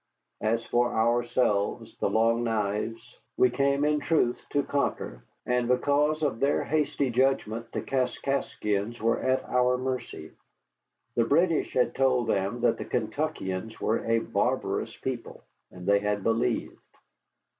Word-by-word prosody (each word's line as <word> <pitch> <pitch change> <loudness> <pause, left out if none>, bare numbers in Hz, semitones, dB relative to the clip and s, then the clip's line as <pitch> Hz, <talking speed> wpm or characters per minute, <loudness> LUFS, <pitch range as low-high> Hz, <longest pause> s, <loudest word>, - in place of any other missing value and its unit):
As 115 +1 0
for 120 0 +1
ourselves, 115 -1 +1
the - - +1
Long 115 +1 +2
Knives, 115 +1 -2 0.2
we 125 - +4
came 140 +2 +1
in 150 0 +2
truth 145 -5 +1
to 145 - +1
conquer, 125 - -2 0.2
and 125 -1 +1
because 145 +5 +2
of 135 -6 0
their 140 +2 +2
hasty 145 -3 0
judgment 120 -3 0
the - - -3
Kaskaskians 120 -4 -1
were 115 +1 +1
at 130 0 +1
our 125 0 +2
mercy. 130 0 -4 0.8
The 115 - +2
British 165 +5 +2
had 125 - +2
told 130 -2 +2
them 100 +5 0
that 120 - +2
the - - -4
Kentuckians 110 -4 -3
were 110 - 0
a 115 0 +3
barbarous 115 - -1
people, 130 -3 -5 0.3
and 90 -1 -11
they 100 +1 +4
had 105 -1 -1
believed. 115 +1 0
120 Hz, 135 wpm, -27 LUFS, 110-135 Hz, 0.8 s, we